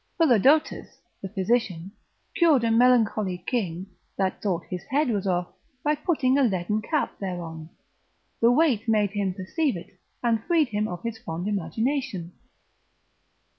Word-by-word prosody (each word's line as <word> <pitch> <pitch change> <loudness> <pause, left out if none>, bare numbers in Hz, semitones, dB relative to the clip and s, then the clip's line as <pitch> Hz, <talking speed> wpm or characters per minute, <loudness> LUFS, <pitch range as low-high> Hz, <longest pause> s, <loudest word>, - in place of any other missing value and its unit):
Philodotus, 290 - +3 0.2
the 195 - -5
physician, 190 -3 -1 0.4
cured 320 -9 +4
a 230 - +2
melancholy 225 -5 +3
king, 185 -7 -2 0.3
that 190 -1 -1
thought 180 -5 -1
his 180 -1 -5
head 280 +3 +1
was 205 -3 -1
off, 175 -1 0 0.3
by 300 - +2
putting 285 -3 +1
a - - +4
leaden 210 -1 0
cap 300 +7 -2
thereon; 165 -4 -6 0.7
the 230 +1 +5
weight 250 -5 +2
made 210 -3 +2
him 200 -2 -1
perceive 195 - -1
it, 180 +2 -13 0.2
and 230 -2 +1
freed 325 -5 +2
him 210 0 -1
of 175 -3 -7
his 230 -1 -4
fond 170 0 -5
imagination. 210 - -2
215 Hz, 140 wpm, -25 LUFS, 185-255 Hz, 0.7 s, the